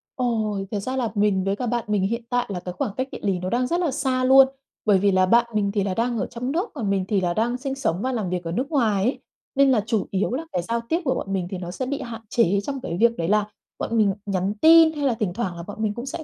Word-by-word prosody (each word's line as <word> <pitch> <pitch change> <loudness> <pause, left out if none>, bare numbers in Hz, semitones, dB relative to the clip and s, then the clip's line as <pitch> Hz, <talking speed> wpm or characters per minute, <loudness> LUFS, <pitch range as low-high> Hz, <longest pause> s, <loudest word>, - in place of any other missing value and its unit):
Ồ, 225 -5 0
thật 210 - -1
ra 255 +6 -3
là 240 -4 0
mình 205 -2 +2
với 195 +1 0
cả 245 - -4
bạn 240 0 -1
mình 205 -2 +1
hiện 235 +4 -1
tại 245 0 +1
là 185 -3 -3
cái 180 0 -6
khoảng 260 -2 -2
cách 260 +1 -1
địa - - -7
lý 190 -3 0
nó 185 - -3
đang 250 +3 +1
rất 345 +5 0
là 335 -5 0
xa 260 -2 0
luôn. 265 +1 +7 0.4
Bởi 205 -3 +5
vì 200 +1 +3
là 185 0 +4
bạn 235 +5 +4
mình 205 -2 +1
thì 200 -1 0
là 190 -1 -1
đang 235 +3 0
ở - - -1
trong 250 +3 -4
nước, 360 +8 -1
còn 210 -4 -3
mình 195 -1 0
thì 200 -2 +1
là 175 -1 0
đang 235 +5 0
sinh 270 +1 -4
sống 200 -9 -1
và 260 - -1
làm 215 -8 -2
việc 180 -1 -2
ở 165 - -4
nước 255 +10 -2
ngoài 220 -9 +2
ấy. 250 - 0 0.4
Nên 275 0 +5
là 225 -5 +3
chủ 220 -2 -1
yếu 195 +4 0
là 305 +6 -3
cái 180 - -1
giao 230 +6 -2
tiếp 335 +3 +1
của 260 - +1
bọn 195 - -4
mình 185 -2 -1
thì 190 - -3
nó 175 -1 -6
sẽ 260 +8 -4
bị 280 +2 -3
hạn 230 -2 -7
chế 200 -5 +2
trong 275 +3 -4
cái 170 - -4
việc 235 0 +3
đấy 165 - -1
là 210 +1 +3 0.3
bọn 230 - -1
mình 205 -3 +3
nhắn 195 0 -1
tin, 325 0 +8
hay 295 -2 -2
là 265 - +3
thỉnh 195 -5 -1
thoảng 195 -5 -3
là 170 - -6
bọn 205 +4 -9
mình 210 -1 0
cũng 240 +3 -6
sẽ 315 +4 -5
225 Hz, 305 wpm, -23 LUFS, 195-255 Hz, 0.4 s, tin